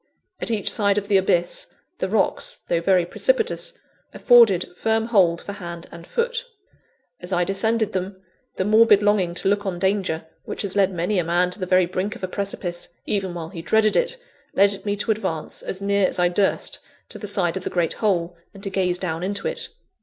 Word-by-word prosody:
At - - -1
each 210 -3 -2
side 200 0 +3
of 200 0 -2
the 200 - +5
abyss, 175 -2 +1 0.3
the - - -1
rocks, - - +1
though 170 -1 +1
very 180 0 +3
precipitous, - - 0 0.4
afforded 220 -8 +5
firm 225 +3 0
hold 180 -7 +3
for - - -6
hand 170 -3 -7
and 170 0 -11
foot. 475 0 -1 0.8
As 180 +1 -6
I 180 -1 +2
descended 220 +3 0
them, 190 +1 -3 0.4
the 185 - -1
morbid 215 -1 +5
longing 195 -4 +2
to - - -2
look 205 +1 +2
on 190 -3 -3
danger, 190 -4 0 0.2
which - - -5
has 200 -1 0
led 195 -1 +3
many 180 +3 0
a - - +1
man 175 +2 +1
to 180 - -4
the 185 - -3
very 185 0 +4
brink 185 +5 -3
of 240 - -13
a - - 0
precipice, 185 -2 -4 0.2
even 190 -4 -2
while 165 -2 -5
he 170 -3 -7
dreaded 215 +5 +3
it, - - +1 0.4
led 200 0 +3
me 205 - +1
to 210 +2 -1
advance 190 -7 -3
as 190 +1 -5
near 200 -1 +3
as - - -3
I 175 -1 +3
durst 195 +2 0 0.3
to - - -6
the 210 - -5
side 190 -4 +1
of 190 - -4
the - - -3
great 170 -2 0
hole, 175 -5 +1 0.2
and 195 - -12
to 195 - -4
gaze 180 -2 0
down 165 -3 -3
into 200 +2 -2
it. - - -3
195 Hz, 205 wpm, -23 LUFS, 175-210 Hz, 0.8 s, the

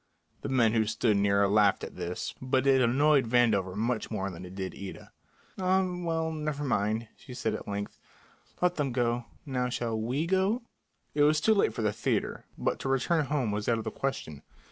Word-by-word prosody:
The - - -4
men 120 -4 +3
who 110 -2 +2
stood 110 -1 +2
near 100 0 +3
laughed 100 -1 +3
at - - -7
this, 90 +1 -4
but 130 0 +1
it 135 -1 +5
annoyed 135 +2 +4
Vandover 110 -7 +3
much 115 +1 -1
more 100 -3 -2
than 90 +1 -9
it 90 - -11
did 95 -1 -4
Ida. 100 -1 -9 0.5
"Ah, 190 0 +3
well, 165 -2 -1
never 150 -2 -3
mind," 110 -3 0
she 125 -2 -11
said 125 - -1
at - - -6
length. 100 0 -4 0.6
"Let 180 0 +2
them 140 -4 -1
go. 120 -1 0 0.2
Now 125 -3 -1
shall 120 -2 -2
we 125 +8 -1
go?" 190 +6 +1 0.5
It 145 - +1
was 150 +1 +5
too 220 - +4
late 195 - +2
for 115 - -2
the 105 -1 +1
theatre, - - -1
but - - -1
to 135 - -3
return 145 +4 +2
home 135 -5 0
was 105 +2 -2
out 115 - +3
of 110 - -4
the - - -4
question. 80 - -4
120 Hz, 200 wpm, -29 LUFS, 105-145 Hz, 0.6 s, it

